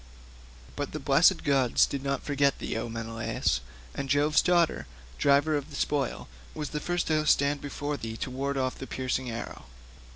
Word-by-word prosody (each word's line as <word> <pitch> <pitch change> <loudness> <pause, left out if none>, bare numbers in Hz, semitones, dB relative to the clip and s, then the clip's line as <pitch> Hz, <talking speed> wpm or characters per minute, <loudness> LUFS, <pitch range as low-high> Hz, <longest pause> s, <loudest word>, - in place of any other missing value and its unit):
But - - -4
the - - -3
blessed - - +4
gods 135 -4 +3
did 140 - -4
not 140 -1 -2
forget 140 -1 +2
thee, - - -4
O 115 +1 -3
Menelaus, 115 - -2 0.3
and 135 - -4
Jove's 145 +2 +4
daughter, 175 -2 +2 0.3
driver 140 +2 +4
of 145 +1 -3
the 145 - -9
spoil, 140 -3 -1 0.3
was 150 -1 -4
the 150 - -2
first 175 +3 -1
to 155 -1 +1
stand 140 0 +3
before 145 0 -4
thee 110 -2 -6
and 125 - -6
ward 140 +1 -2
off 130 -1 -1
the 135 - -6
piercing 130 -1 -2
arrow. 115 - -6
140 Hz, 175 wpm, -28 LUFS, 130-145 Hz, 0.3 s, blessed